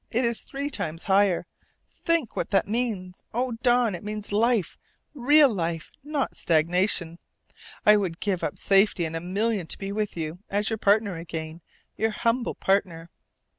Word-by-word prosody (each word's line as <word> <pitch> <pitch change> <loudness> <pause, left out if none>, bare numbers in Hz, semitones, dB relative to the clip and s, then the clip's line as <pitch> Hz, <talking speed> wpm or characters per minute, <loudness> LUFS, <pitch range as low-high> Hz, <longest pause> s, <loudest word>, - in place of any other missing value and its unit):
It 245 +2 +1
is 235 -1 +2
three 280 +1 -5
times 160 - -4
higher! 195 -2 +3 0.5
Think 335 -8 -1
what - - -2
that 195 - +2
means. 205 -5 -3
Oh, 250 +1 0
Don, 240 -3 +3
it 175 - -6
means 210 0 -5
life, 220 -3 +1 0.4
real 290 0 +5
life, 165 -3 -3
not 295 -1 -2
stagnation! 170 +1 +1 0.7
I 210 0 +7
would 180 -5 -2
give 195 -4 -1
up 145 - -2
safety 195 -3 +3
and 160 0 -5
a - - -1
million 195 +1 -1
to - - -4
be 195 0 -5
with 210 -2 -3
you 160 +1 -4
as 205 +3 0
your 220 - -1
partner 205 -3 +2
again, 165 0 -6 0.4
your 220 +1 +1
humble 230 +2 -1
partner. 175 -4 0
200 Hz, 165 wpm, -26 LUFS, 175-230 Hz, 0.7 s, I